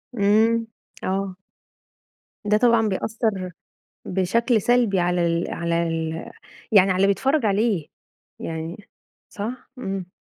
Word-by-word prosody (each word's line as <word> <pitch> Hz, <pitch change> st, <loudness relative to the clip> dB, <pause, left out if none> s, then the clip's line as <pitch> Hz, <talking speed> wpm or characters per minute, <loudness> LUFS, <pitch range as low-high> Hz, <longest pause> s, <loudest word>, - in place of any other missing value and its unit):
امم، 220 Hz, +2 st, +3 dB, 0.4 s
آه. 190 Hz, 0 st, -2 dB, 1.1 s
ده 210 Hz, +1 st, +3 dB
طبعًا 230 Hz, -2 st, +4 dB
بيأثر 200 Hz, -2 st, -2 dB, 0.5 s
بشكل 215 Hz, +4 st, +1 dB
سلبي 240 Hz, -6 st, +3 dB
على 175 Hz, 0 st, +1 dB
ال 170 Hz, 0 st, 0 dB
على 170 Hz, 0 st, 0 dB
ال 160 Hz, 0 st, -3 dB, 0.4 s
يعني 195 Hz, -2 st, +6 dB
على 185 Hz, -, +2 dB
اللي 195 Hz, +1 st, +4 dB
بيتفرج 265 Hz, +7 st, +1 dB
عليه، 200 Hz, -5 st, +1 dB, 0.5 s
يعني 165 Hz, +6 st, -6 dB, 0.4 s
صح، 225 Hz, +5 st, -6 dB
إمم. 195 Hz, -5 st, -4 dB
195 Hz, 110 wpm, -23 LUFS, 180-225 Hz, 1.1 s, يعني